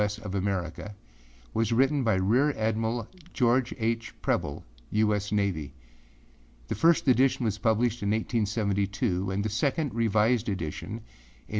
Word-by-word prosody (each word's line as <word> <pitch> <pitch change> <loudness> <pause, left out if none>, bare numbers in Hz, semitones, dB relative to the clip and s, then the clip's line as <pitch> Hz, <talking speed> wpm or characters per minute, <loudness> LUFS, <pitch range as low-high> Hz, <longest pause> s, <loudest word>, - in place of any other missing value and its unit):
S. 105 0 0
of 110 -3 -7
Americaâ 100 +1 -3 0.6
was 115 0 0
written 135 +4 +3
by 110 -4 +2
Rear 120 +11 +2
Admiral 110 +1 -1 0.3
George 125 0 +2
H. 115 0 -2
Preble, - - -1 0.2
U. 105 0 +2
S. 105 0 -2
Navy. 90 -9 -1 0.9
The - - 0
first 165 -2 +3
edition 130 -1 +3
was 105 -1 -1
published 115 +2 +1
in 100 - -1
1872 100 -3 0
and 100 +2 -1
the - - 0
second, 140 +6 0
revised, 115 +1 +2
edition, 85 -3 -4
in 105 - -6
1880. - - -26
110 Hz, 145 wpm, -28 LUFS, 100-120 Hz, 0.9 s, written